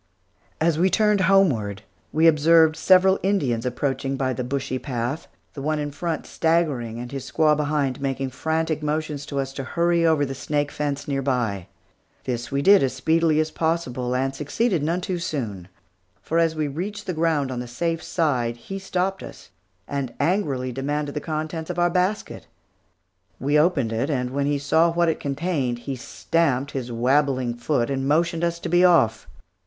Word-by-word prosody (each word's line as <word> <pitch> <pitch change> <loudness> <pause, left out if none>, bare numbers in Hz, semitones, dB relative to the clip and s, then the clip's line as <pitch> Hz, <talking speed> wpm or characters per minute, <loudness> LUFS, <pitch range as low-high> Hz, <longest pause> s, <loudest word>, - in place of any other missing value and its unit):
As 160 -1 +2
we 185 +2 +4
turned 210 0 +3
homeward, 140 - +2 0.3
we 160 +2 +2
observed 160 0 +5
several 190 +3 +4
Indians 135 - 0
approaching 135 +1 -2
by 130 -1 0
the 125 - -3
bushy 130 0 -3
path, 125 +3 -3 0.3
the 140 - -7
one 155 +2 0
in 145 -1 -3
front 165 +2 -3
staggering, 150 -9 0
and 120 0 -7
his 135 -2 -6
squaw 155 -1 +3
behind, 145 -3 -1
making 135 -1 -2
frantic 160 +3 -1
motions 150 -1 -3
to 140 - -3
us 135 0 -3
to 135 - -5
hurry 170 +4 +1
over 160 -3 +3
the 135 - -4
snake 145 +2 -2
fence 145 -1 -3
near 135 -1 -1
by. 120 -9 -1 0.6
This 120 -2 -4
we 140 +1 0
did 200 +1 +7
as 130 -2 +1
speedily 160 +3 +2
as 155 0 0
possible, 130 -7 -1
and 135 +1 0
succeeded 165 - 0
none 165 +4 0
too 180 -1 -3
soon; 115 - -4 0.5
for 165 - -1
as 165 -1 +2
we 155 -1 -1
reached 195 +9 -5
the 180 - -2
ground 155 -4 0
on 125 - -3
the 125 - -5
safe 165 +7 -2
side, 125 -8 0
he 195 +11 -7
stopped 190 0 -2
us, - - -11 0.4
and 140 -4 -4
angrily 145 -9 0
demanded 145 +3 -2
the 150 - -3
contents 155 +1 -4
of 180 - -4
our 175 0 +2
basket. 185 +4 -1 0.9
We 145 +3 +2
opened 150 -9 +2
it, 120 +6 -1
and 125 -4 -1
when 140 +1 -1
he 145 0 +1
saw 160 +4 +3
what 170 0 +2
it 160 - -1
contained 140 -4 -1
he 135 +3 -5
stamped 140 +1 -1
his 125 -3 -4
wabbling 130 +1 +1
foot 120 +1 -1
and 135 0 -1
motioned 165 +3 +1
us 170 0 0
to - - -4
be 175 +1 +3
off. 115 -12 +4
145 Hz, 180 wpm, -23 LUFS, 130-165 Hz, 0.9 s, did